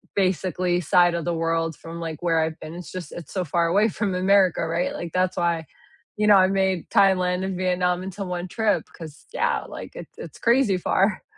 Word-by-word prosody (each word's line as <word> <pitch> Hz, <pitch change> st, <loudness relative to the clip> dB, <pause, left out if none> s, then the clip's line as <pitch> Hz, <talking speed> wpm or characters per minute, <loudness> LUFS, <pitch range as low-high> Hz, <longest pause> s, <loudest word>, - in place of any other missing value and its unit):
basically 185 Hz, -1 st, 0 dB
side 175 Hz, +1 st, +4 dB
of 170 Hz, -, -3 dB
the 175 Hz, -, 0 dB
world 165 Hz, -1 st, -1 dB
from, 165 Hz, +2 st, -9 dB
like, 160 Hz, -2 st, -5 dB
where 165 Hz, -2 st, +2 dB
I've 160 Hz, 0 st, -2 dB
been. 155 Hz, -, -8 dB
It's 175 Hz, 0 st, -9 dB
just 185 Hz, -2 st, -7 dB
it's 170 Hz, -4 st, -9 dB
so 185 Hz, -, -1 dB
far 170 Hz, +2 st, +1 dB
away 200 Hz, +6 st, +3 dB
from 205 Hz, -2 st, -2 dB
America, 185 Hz, -1 st, +3 dB
right? 170 Hz, +2 st, -1 dB
Like, 170 Hz, -, -6 dB
that's 185 Hz, 0 st, 0 dB
why, 170 Hz, -2 st, 0 dB, 0.5 s
you 210 Hz, 0 st, +1 dB
know, 205 Hz, -, +8 dB
I 185 Hz, -, +6 dB
made 190 Hz, -2 st, 0 dB
Thailand 185 Hz, -3 st, +3 dB
and 190 Hz, -1 st, -3 dB
Vietnam 180 Hz, -1 st, 0 dB
into 190 Hz, +1 st, -5 dB
1 180 Hz, 0 st, -4 dB
trip, 205 Hz, -3 st, 0 dB
'cause 160 Hz, -3 st, -11 dB
yeah, -, -, 0 dB
like, -, -, -9 dB
it -, -, -8 dB
it's -, -, -9 dB
crazy 235 Hz, -5 st, +3 dB
far. 195 Hz, +3 st, +1 dB
180 Hz, 205 wpm, -24 LUFS, 170-190 Hz, 0.5 s, know